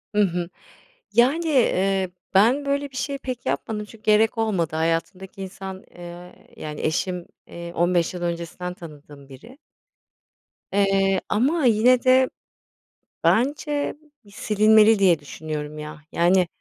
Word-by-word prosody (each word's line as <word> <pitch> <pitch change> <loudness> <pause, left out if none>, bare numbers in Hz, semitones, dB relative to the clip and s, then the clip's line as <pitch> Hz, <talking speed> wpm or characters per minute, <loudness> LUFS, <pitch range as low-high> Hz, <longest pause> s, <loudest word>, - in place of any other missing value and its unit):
Hı 210 - +4
hı. 175 -3 0 0.6
Yani, 265 +10 +3
eee, 195 - +2 0.2
ben 235 +9 +4
böyle 280 0 -1
bir 265 - -12
şeyi 275 +2 -3
pek 255 -3 -6
yapmadım 210 +11 -2
çünkü 215 +1 -16
gerek 220 +2 +3
olmadı. 190 -8 0
Hayatımdaki 165 +4 -2
insan, 190 0 -8
eee, 175 0 -12
yani, 150 -1 -7
eşim, 175 +2 -2 0.2
eee, 170 0 -8
15 175 0 +1
yıl 180 - -6
öncesinden 170 +1 -4
tanıdığım 145 -4 -13
biri. 185 - -14 1.2
Eee, 195 -1 +2
ama 280 +7 +1
yine 240 +2 +4
de 255 0 +4 0.9
bence 285 +4 +1 0.3
bir 205 - -18
silinmeli 215 +1 +4
diye 180 -5 +4
düşünüyorum, 150 0 -6
ya. 150 0 -8
Yani, 180 +1 +3
195 Hz, 125 wpm, -23 LUFS, 170-230 Hz, 1.2 s, Hı